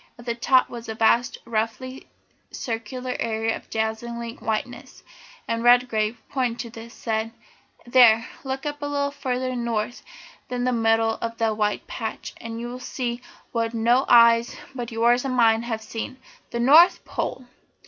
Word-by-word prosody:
At 240 - -13
the 235 - -1
top 255 +2 +3
was 235 -1 -8
a 220 - -4
vast, 230 +2 +2
roughly 235 +4 -3 0.4
circular 250 +2 -4
area 225 0 -1
of - - -12
dazzling 230 +1 -3
whiteness, 225 +3 -4 0.4
and 230 0 -1
Redgrave, 240 -2 +3
pointing 250 -4 -1
to 235 - -5
this, 230 0 -10
said: 220 -1 -2 0.5
"There, 240 -2 +6 0.2
look 265 +1 -4
up 295 0 -4
a 290 - -2
little 285 -1 -1
further 255 -2 -2
north 235 -1 -2 0.5
than 245 -1 -2
the 250 0 +1
middle 225 -1 +2
of 230 0 -4
that 225 -2 +1
white 210 -1 -1
patch, 220 -2 -5
and 230 0 -6
you'll 240 +1 -6
see 245 -1 -4 0.3
what 230 0 -1
no 240 +4 +3
eyes 235 0 +6 0.2
but 240 -2 -5
yours 235 +2 +3
and 265 -2 -2
mine 225 -2 +4
have 235 0 -4
ever - - -11
seen 230 +4 -6 0.3
the 235 - -4
North 310 +9 +6
Pole! 250 0 -4
235 Hz, 160 wpm, -24 LUFS, 225-250 Hz, 0.5 s, There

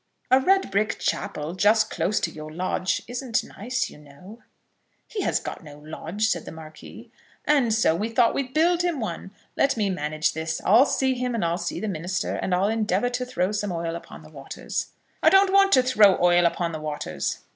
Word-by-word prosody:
"A 260 - +7
red 385 - +2
brick 210 +3 0
chapel, 150 +2 -3
just 215 +4 +3
close 180 +5 0
to - - -1
your 155 0 -9
lodge, 185 +2 -2
isn't 245 -1 -2
nice, 250 +6 -3
you - - -14
know." 150 +10 -14 0.7
"He 425 - -4
has - - 0
got - - -7
no 145 -2 -12
lodge," 160 +7 -4
said 175 -7 -1
the - - -8
Marquis. 155 -1 -12 0.3
"And 275 -6 +3
so 215 -7 +3
we 210 +6 -2
thought 230 0 +3
we'd 260 -2 -3
build 335 +4 +2
him 350 -5 -1
one. 190 -4 -5 0.3
Let 275 -3 +2
me 205 -3 0
manage 155 -2 -1
this. 160 0 -3
I'll 230 +8 +6
see 265 -1 +1
him, 250 -1 -2
and 210 - -1
I'll 170 +1 -1
see - - -4
the 220 - -3
minister, 180 0 -3
and 180 - -1
I'll 190 +2 +1
endeavour 215 0 0
to 250 0 -3
throw 185 -5 -1
some 205 -2 -2
oil 165 -1 -3
upon 170 - -10
the - - -15
waters." - - -5 0.3
"I - - +6
don't 385 +2 +4
want 395 0 +5
to 255 - +6
throw 215 -7 +5
oil 175 0 +4
upon 170 0 -2
the 155 -1 -6
waters." 150 -1 -4
205 Hz, 205 wpm, -24 LUFS, 170-250 Hz, 0.7 s, A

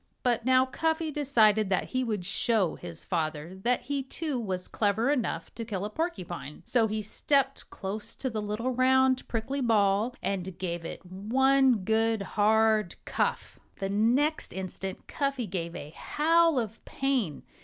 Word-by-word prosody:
But 240 -2 +1
now 260 0 +5
Cuffy 320 +4 -1
decided 220 -8 +3
that 190 - 0
he 255 0 0
would 210 -7 -2
show 200 -1 +2
his 170 -2 -7
father 160 -1 -2
that 245 +3 +1
he 275 +2 -2
too 270 0 -3
was 185 -5 -3
clever 220 +5 +1
enough 230 - -2
to 230 - -5
kill 205 -4 -3
a 210 - -5
porcupine. 180 - -4
So 230 -3 +2
he 215 0 -2
stepped 270 +5 0
close 200 +2 -5
to 265 - -3
the 220 -4 -2
little 210 +5 -2
round, 260 +1 +3
prickly 255 +5 -2
ball 215 0 +2
and 190 -2 -2
gave 170 -2 -3
it 175 - -7
one 250 +5 +3
good, 225 -1 +2
hard 215 -2 +3
cuff. - - -2 0.2
The 195 - -3
next 245 +10 +2
instant 190 0 -5
Cuffy 275 -4 -2
gave 175 -3 -4
a 150 -3 -7
howl 330 - +2
of 225 -2 -3
pain. 265 - -1
220 Hz, 155 wpm, -28 LUFS, 195-260 Hz, 0.2 s, now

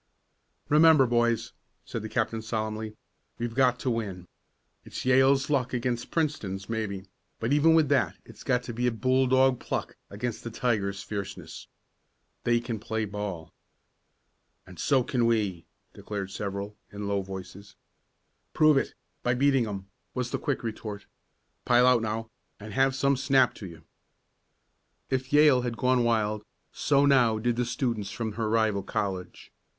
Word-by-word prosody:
"Remember, 155 -2 +6
boys," 120 -1 +1 0.3
said - - -5
the - - -6
captain 115 -1 -1
solemnly, 110 -1 -3 0.4
"we've 120 -1 -3
got 125 -1 +3
to 125 - 0
win. 100 -6 -4 0.6
It's - - -7
Yale's 135 +1 +4
luck 130 -3 +1
against 120 -1 -2
Princeton's 105 - -2
maybe, 105 -4 -3 0.3
but 115 +5 0
even 160 +3 +5
with 160 -2 +4
that 140 - +2
it's - - -13
got 125 -2 +1
to 120 - -6
be 125 +2 +1
bulldog 130 +2 +3
pluck - - -4
against 110 +3 -4
the 115 - -4
tiger's 105 -4 -1
fierceness. 100 -2 -6 0.8
They 120 0 +3
can 115 -2 -4
play 110 +1 -2
ball." 100 -5 -5 1.1
"And 90 -3 -13
so 135 -3 +3
can 120 -2 +1
we!" 100 -8 0 0.3
declared 100 -2 -5
several, 100 +1 -4 0.2
in 100 0 -5
low 100 -1 0
voices. 95 +1 -9 0.8
"Prove 155 -2 +5
it - - -1 0.3
by 120 0 +1
beating 135 -2 +3
'em!" 100 -2 -5 0.3
was 125 -1 -2
the - - -1
quick 140 -4 -2
retort. 105 -2 -5 0.6
"Pile 125 0 +5
out 125 -2 +5
now, 110 0 -3 0.3
and 105 0 -9
have 135 +2 +2
some 140 +1 +2
snap 135 -1 +3
to 100 - -8
you!" 80 -2 -12 1.3
If 130 0 -1
Yale 145 -3 +6
had 120 -2 -3
gone 125 -1 +2
wild, 110 -2 +1 0.3
so 140 -1 +2
now 125 -6 +4
did 120 +2 0
the 125 +1 0
students 115 -5 -2
from 115 -1 -4
her 110 0 -2
rival 110 -3 +2
college. 95 -2 -4
115 Hz, 150 wpm, -27 LUFS, 105-130 Hz, 1.3 s, Remember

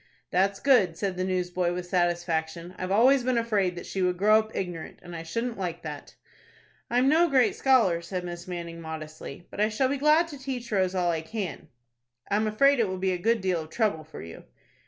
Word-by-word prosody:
"That's 195 +2 +2
good," 205 -12 +3
said 195 -3 -2
the 185 - -2
newsboy, 180 -1 -1
with 180 0 -4
satisfaction. 175 -1 -1
"I've 185 - -3
always 250 +6 +5
been 255 -1 +1
afraid 205 -6 +1
that 175 - -7
she 195 - -3
would 180 -1 +1
grow 215 +3 +5
up 220 0 -6
ignorant, 175 -4 -5
and 175 -1 -9
I 165 - -5
shouldn't 230 +7 -3
like 175 -3 -4
that." 150 -3 -8 0.7
"I'm 245 +2 +3
no 330 +4 +4
great 255 -5 +3
scholar," 230 -11 +3
said 180 +1 -4
Miss 175 0 -7
Manning, 170 -2 -6
modestly; 155 0 -8
"but - - -4
I 215 - +3
shall 255 +4 +1
be 280 - 0
glad 305 +4 +4
to 290 -3 -9
teach 255 -3 -5
Rose 190 -2 +1
all 175 -2 +2
I 165 -1 -2
can." 195 +3 -5 0.6
"I - - +3
am 215 +1 +1
afraid 275 +6 +4
it 225 - +3
will 185 0 -3
be 190 0 0
a - - -1
good 225 +3 +1
deal 185 -3 0
of 155 - -10
trouble 205 -6 0
for 155 - -10
you." 80 0 -10
185 Hz, 220 wpm, -27 LUFS, 175-230 Hz, 0.7 s, always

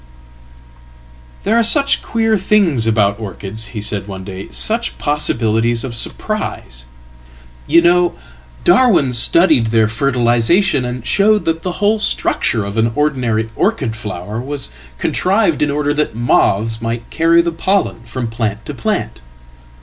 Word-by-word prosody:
"There 215 +3 +1
are - - +4
such 275 +5 +4
queer 225 -1 0
things 185 - +2
about 105 -2 +1
orchids," 105 +1 -5
he - - -3
said 100 -1 -3
one 95 -2 -7
day; 95 0 -8
"suchpossibilities 120 - 0
of 130 -3 -5
surprises. 65 - -4 0.8
You 170 - +5
know, 175 0 +3 0.5
Darwin 175 - +3
studied 150 0 +4
their 110 -1 +2
fertilisation, 125 - +1
and 125 -1 -6
showed 210 - +2
that 165 0 -1
the 180 0 -4
whole 210 +4 +1
structure 115 - 0
of 100 +2 -6
an 115 +1 +1
ordinary 125 -7 0
orchid 145 - -1
flower 105 0 -6
wascontrived 135 - -1
in 150 - +2
order 145 0 0
that 150 -6 -2
moths 115 -1 +1
might 115 0 -4
carry 165 +1 +3
the 170 - -1
pollen 185 -5 -1
from 120 +1 -5
plant 115 -1 -4
to 150 - -6
plant. 115 - -3
125 Hz, 135 wpm, -16 LUFS, 110-175 Hz, 0.8 s, You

